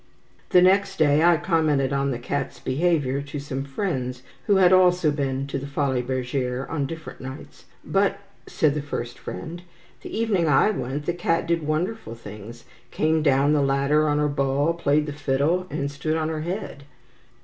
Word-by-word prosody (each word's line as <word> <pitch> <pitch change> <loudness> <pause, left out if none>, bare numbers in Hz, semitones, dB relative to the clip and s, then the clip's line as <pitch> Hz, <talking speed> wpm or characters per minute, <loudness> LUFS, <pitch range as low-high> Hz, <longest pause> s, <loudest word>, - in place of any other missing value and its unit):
The 180 - +6
next 195 +2 +3
day 150 0 +4
I 175 -1 +5
commented 155 -6 +1
on 140 0 0
the 125 - -2
cat's 125 +1 -4
behaviour 140 0 0
to 140 +1 -7
some 135 -1 -4
friends 135 -5 -3 0.2
who 205 - +4
had 185 -1 +5
also 180 -3 +4
been 135 -2 -2
to 140 0 -4
the 140 - -6
Folies 140 -3 -1
Bergere 130 0 -2
on 145 -4 -2
different 160 +1 -8
nights. 130 +2 -10 0.2
"But," 195 0 +1 0.3
said 150 -3 +1
the 150 - -2
first 120 -4 -5
friend, 170 +2 -7 0.4
"the - - -8
evening 210 -7 +1
I 150 +9 +4
went, 145 -5 -4
that 175 +2 -2
cat 165 -1 +1
did 170 0 0
wonderful 155 - -2
things; 115 +1 -10 0.3
came 155 0 +1
down 140 0 +3
the 150 - +3
ladder 140 +3 +2
on 145 - +1
her 150 0 +2
ball, 140 +2 +1
played 150 -3 +1
the 150 - -5
fiddle, 145 +6 0
and 140 0 -3
stood 155 +3 -2
on 155 0 -1
her 155 -1 -3
head." 170 -4 -5
145 Hz, 180 wpm, -24 LUFS, 135-165 Hz, 0.4 s, The